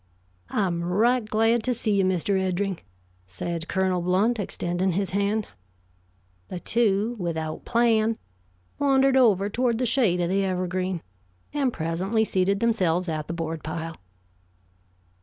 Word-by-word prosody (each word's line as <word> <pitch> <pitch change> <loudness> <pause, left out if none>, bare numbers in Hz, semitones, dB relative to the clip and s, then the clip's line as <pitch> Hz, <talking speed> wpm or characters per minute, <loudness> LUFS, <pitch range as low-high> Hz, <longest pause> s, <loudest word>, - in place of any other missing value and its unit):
"I'm 175 -4 0
right 225 +8 +2
glad 225 +2 +2
to 250 +2 0
see 220 -1 0
you, - - +3
Mr. 185 +1 +1
Eddring," 190 0 -1 0.5
said 165 - -4
Colonel 190 -2 0
Blount, 195 +7 +2
extending 180 -1 -1
his 190 0 -1
hand. 200 +2 0 1.0
The 180 - -5
two, 220 +2 +1
without 160 -3 -3
plan, 225 -2 +2 0.6
wandered 270 -1 +3
over 210 -7 +4
toward 235 +2 0
the 250 - 0
shade 225 -8 +2
of 175 -1 0
the 195 +1 +1
evergreen, 185 -1 -2 0.5
and 280 -4 +1
presently 185 +6 0
seated 195 0 +1
themselves 185 -7 +1
at 155 -1 -3
the 170 - -4
board 165 -1 -4
pile. 165 +1 -5
195 Hz, 135 wpm, -25 LUFS, 175-225 Hz, 1.0 s, over